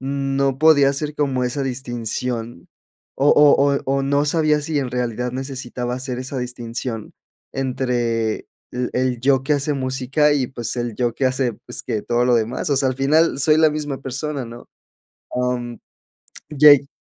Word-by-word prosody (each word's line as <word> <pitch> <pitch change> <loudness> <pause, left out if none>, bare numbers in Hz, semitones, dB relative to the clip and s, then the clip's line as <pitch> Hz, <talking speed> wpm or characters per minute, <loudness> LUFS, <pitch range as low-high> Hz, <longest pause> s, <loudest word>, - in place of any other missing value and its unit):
no 135 0 -1
podía 150 -2 +6
hacer 145 +2 -2
como 135 -4 0
esa 125 +3 -2
distinción 120 -4 -4 0.5
o 140 +2 +3
o 145 -1 +5
o - - -2
o 135 +1 0
no 140 +1 +1
sabía 150 0 +2
si 150 0 -1
en 130 -3 -3
realidad 125 -1 -2
necesitaba 125 -2 -4
hacer 125 -1 -4
esa 130 +1 -5
distinción 120 -2 -5 0.4
entre 120 -4 -1 0.3
l 125 0 -2
el 125 -2 0
yo 135 0 +2
que 150 - +1
hace 145 +1 0
música, 135 +3 +1
y 135 -4 0
pues 120 -4 -4
el 120 -3 -3
yo 120 -2 0
que 135 - 0
hace 130 -1 0
pues - - -6
que 105 - -2
todo 120 0 +1
lo 125 -1 +3
demás, 115 +6 -1
o 140 - +2
sea, 135 0 +2
al 130 - -2
final 150 +4 +2
soy 155 +2 +4
la 160 -1 +5
misma 150 -2 -4
persona, 135 +1 -4
¿no?, 120 +1 -11 0.7
am, 125 -1 -2 0.7
ye 145 -2 +6
130 Hz, 170 wpm, -21 LUFS, 125-140 Hz, 0.7 s, podía